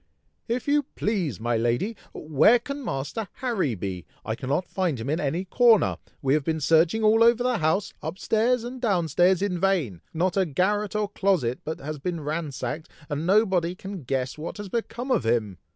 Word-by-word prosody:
"If 240 +3 -2
you 295 +1 +4
please, 185 - -1
my 120 +1 0
lady! 120 - 0 0.2
where 155 - +4
can 280 +4 -6
Master 195 - -3
Harry 205 - -1
be? 90 -2 -5 0.2
I 110 - -1
cannot 135 +9 -1
find 175 -8 -1
him 125 +5 -3
in 160 - 0
any 165 +6 -1
corner! 230 +2 +4 0.3
we 135 0 +3
have 150 -1 +2
been 160 +2 -1
searching 165 +8 +3
all 220 +1 +5
over 235 +1 +4
the 250 -1 +1
house, 160 +5 0
up 160 +4 -5
stairs 230 +4 +1
and 245 +1 -7
down 185 -9 +1
stairs, 180 +5 +3
in 180 -3 -1
vain. 170 - 0
Not 175 +2 0
a 190 -2 +3
garret 205 +7 0
or 210 - +1
a - - -1
closet 185 - 0
but 160 - -4
has 150 +1 -5
been 170 +2 -3
ransacked, 150 -1 -4 0.2
and 150 +2 -2
nobody 185 -4 +3
can 195 -1 -7
guess 130 +1 -2
what 160 - -5
has 205 -1 -7
become 235 +4 -3
of - - +2
him!" 110 -5 0
175 Hz, 195 wpm, -25 LUFS, 140-215 Hz, 0.3 s, all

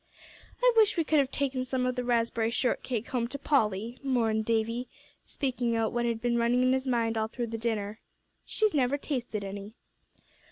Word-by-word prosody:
"I - - +6
wish 435 -4 +5
we 330 - +3
could 310 -1 +3
have 275 -2 +2
taken 270 -2 -1
some 255 0 -1
of 255 - +1
the 250 - -2
raspberry 230 -2 +1
shortcake 240 -1 -1
home 240 -2 0
to 280 - -6
Polly," 230 -5 0
mourned 230 -5 +1
Davie, 230 +2 0 0.4
speaking 245 -4 -1
out 225 -1 +1
what 240 0 0
had 230 -1 -1
been 240 -1 +2
running 240 +2 +3
in 255 0 +4
his 265 0 -1
mind 230 -3 +1
all 220 - 0
through 235 0 -4
the - - -1
dinner. 215 -2 -2 0.4
"She's 430 -2 +1
never 275 -1 +2
tasted 245 -8 -3
any." 200 +2 -7
240 Hz, 190 wpm, -29 LUFS, 225-260 Hz, 0.4 s, I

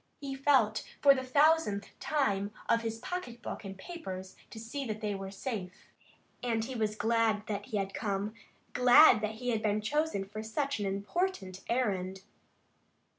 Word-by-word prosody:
He 275 -1 -5
felt 265 -6 +3 0.2
for 280 -1 +7
the 260 -1 -3
thousandth 285 -6 +3
time 205 -10 0 0.2
of 230 0 +3
his 225 -1 -3
pocket 245 -4 -6
book - - -5
and 195 -1 -7
papers 190 - -7
to 225 - -9
see 230 +6 -5
that 215 -1 -3
they 210 -1 -2
were 195 -1 -5
safe, 195 -3 -6 0.5
and 230 -2 0
he 265 - -5
was 215 -3 -1
glad 225 -1 +1
that 205 -1 -4
he 220 -5 -2
had 195 -1 -2
come, 205 0 -2 0.4
glad 250 -1 +7
that 215 0 -2
he 245 +2 -4
had 225 -3 +1
been 210 -1 +1
chosen 295 -1 0
for 210 +2 -7
such 250 +4 -2
an 205 - -1
important 200 - -2
errand. 190 -6 -1
220 Hz, 170 wpm, -31 LUFS, 200-260 Hz, 0.5 s, for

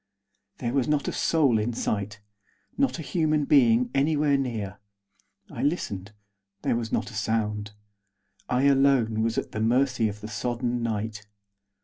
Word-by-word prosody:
There 120 0 -3
was 135 -3 +1
not 150 -1 +1
a - - 0
soul 140 -9 +2
in 115 +3 -1
sight. 105 -2 -2 0.5
Not 275 -1 +1
a 160 - -6
human 155 -2 +1
being 125 -4 +4
anywhere 145 +1 +2
near. 110 -7 -3 0.7
I - - -5
listened; 105 - -2 0.5
there - - +1
was 115 -1 -3
not - - -1
a - - -13
sound. 105 -1 -2 0.8
I 125 +1 +1
alone 135 -5 +3
was 115 0 0
at - - -2
the 110 - -3
mercy 120 0 +2
of 105 +1 -9
the 105 - -6
sodden 120 +2 -2
night. 110 -2 -3
120 Hz, 150 wpm, -26 LUFS, 110-140 Hz, 0.8 s, being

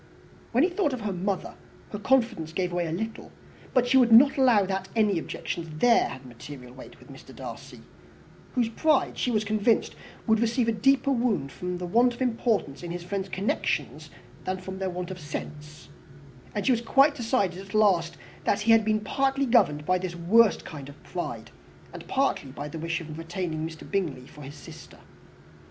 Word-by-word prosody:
When 245 +4 +3
she 360 - +2
thought 350 -7 0
of 250 - -4
her 205 -2 -2
mother, 190 +1 -2
indeed, - - -21
her 205 - -5
confidence 225 -10 +1
gave 180 0 -1
way 175 -1 0
a - - -4
little; 220 +7 -5 0.4
but 250 -2 +2
she 260 +2 +4
would 245 -3 +5
not 260 +5 +8
allow 245 -7 +4
that 190 0 -3
any 210 -5 +3
objections 165 +1 -5
there 235 +3 +4
had 130 - -9
material 125 +1 -11
weight 130 - -12
with - - -15
Mr. - - -13
Darcy, - - -9 0.7
whose 245 -3 +2
pride, 305 +5 +1
she - - +1
was 215 -3 +1
convinced, 215 +2 +1 0.3
would 220 -2 +3
receive 235 +1 +1
a - - +3
deeper 270 +5 +2
wound 235 - 0
from 180 0 -4
the 180 - -5
want 235 +7 +3
of 240 - -13
importance 225 - 0
in 175 - -6
his 175 0 -5
friend's 195 +1 -4
connections 190 +3 -2 0.3
than 185 0 -2
from 190 +1 -7
their 190 -1 -1
want 180 0 -5
of 185 - -7
sense; 150 0 -8 0.7
and 205 - -2
she - - +4
was 235 -2 +2
quite 275 +5 +4
decided, 225 -8 0
at 195 +1 -9
last, 185 -6 +3 0.3
that 205 - +1
he 225 +2 +3
had 225 -1 +6
been 215 0 +1
partly 270 +5 0
governed 150 - +3
by 185 +2 +2
this 180 -1 -4
worst 205 +6 +4
kind 145 -3 -8
of 145 - -15
pride, 175 - -5 0.4
and - - -9
partly 265 - 0
by 145 +2 -6
the 160 +2 -7
wish 165 +2 -2
of 155 -1 -8
retaining 165 -2 -3
Mr. 160 -1 -11
Bingley 165 -10 -2
for 150 - -14
his 140 +1 -9
sister. - - -12
195 Hz, 195 wpm, -27 LUFS, 170-235 Hz, 0.7 s, not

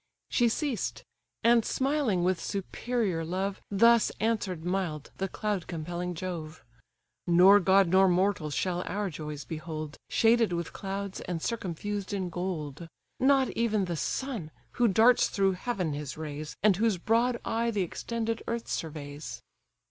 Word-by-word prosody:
She 240 -2 +3
ceased; 270 0 -2 0.4
and, 230 0 +5
smiling 265 -10 +1
with 180 -1 +1
superior 200 -2 -2
love, 190 +4 -2
Thus 230 +3 +5
answer'd 205 -7 -1
mild 175 -5 -2
the 195 - -1
cloud 205 -2 -2
compelling 175 +1 -4
Jove: 160 -3 -6 0.6
"Nor 185 +4 +7
god 190 0 +4
nor 190 +2 +5
mortal 180 -3 +1
shall 175 +4 -1
our 200 -1 -2
joys 150 -1 -6
behold, 155 -2 -6
Shaded 225 -3 +3
with 170 -1 -3
clouds, 195 0 -4
and 175 -2 -3
circumfused 205 0 -3
in 185 -3 -2
gold; 170 -4 -4 0.3
Not 265 -1 +4
even 220 -4 +1
the 175 -1 -3
sun, 225 - -3 0.2
who 245 -1 +2
darts 225 +4 +5
through 195 -1 +2
heaven 185 -4 -2
his 145 -2 -5
rays, 155 0 -6
And 205 -4 +5
whose 220 -2 +2
broad 235 +6 +2
eye 230 +1 0
the 205 -4 0
extended 230 +5 -3
earth 235 0 -3
surveys." 150 -2 -5
190 Hz, 140 wpm, -29 LUFS, 170-225 Hz, 0.6 s, Nor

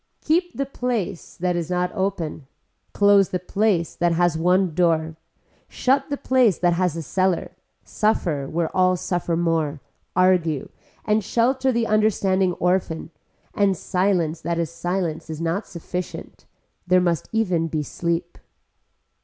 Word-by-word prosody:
Keep 350 +3 0
the 275 - 0
place 235 -9 -3
that 180 0 0
is 170 -1 -3
not 180 0 0
open, 190 -8 -3 0.4
close 200 -1 +4
the 180 - -1
place 185 -1 0
that 175 -1 +1
has 175 -1 +2
one 180 +1 +2
door, 160 -2 +1 0.5
shut 270 +4 +1
the 285 - -2
place 250 - +3
that 175 -1 +2
has 175 -2 0
a 165 - -4
cellar, 185 +4 0 0.3
suffer 170 -10 0
where 165 0 -2
all 185 0 +4
suffer 175 -1 -1
more, 165 -3 0 0.4
argue, 175 -5 +2 0.4
and 215 0 +2
shelter 260 +5 +1
the 235 -1 0
understanding 195 -4 +2
orphan, 180 -2 -1 0.4
and 195 -3 +2
silence 180 -4 0
that 170 0 -2
is 170 -2 -1
silence 175 -2 -3
is 155 -1 -5
not 170 +5 -2
sufficient 180 +1 -7 0.4
there 180 0 +5
must 175 -3 0
even 185 -7 +1
be 155 -1 -2
sleep. 170 +3 -3
180 Hz, 140 wpm, -23 LUFS, 165-200 Hz, 0.5 s, there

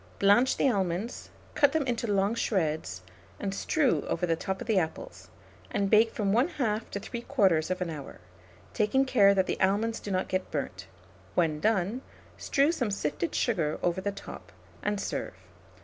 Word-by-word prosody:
Blanch 205 +6 +4
the - - +3
almonds, 195 0 -1 0.2
cut 285 -1 +4
them 315 -3 +1
into 235 -3 -1
long 200 +2 +2
shreds, 155 - -1 0.4
and 195 -1 -3
strew 280 +6 +1
over 180 - 0
the 165 -1 +1
top 190 +3 -4
of - - -6
the 215 -4 +3
apples, 160 -2 -5 0.4
and 200 -1 -1
bake 220 +1 +5
from 200 -2 -1
1/2 240 -4 0
to 200 - -4
3/4 190 - 0
hour, 150 -3 -8 0.5
taking 245 +6 +2
care 200 -6 +5
that 190 -1 +3
the - - -3
almonds 210 +4 +1
do - - -7
not 185 -1 0
get 185 0 -2
burnt: 95 - -4 0.5
when 155 -3 +1
done, 215 +4 +1 0.3
strew 280 +3 +2
some 250 -10 -1
sifted 165 -4 -2
sugar 165 -10 0
over 175 +1 +1
the 200 +1 -1
top, 200 - -10 0.3
and 205 -1 -1
serve. - - -4
200 Hz, 165 wpm, -28 LUFS, 180-230 Hz, 0.5 s, bake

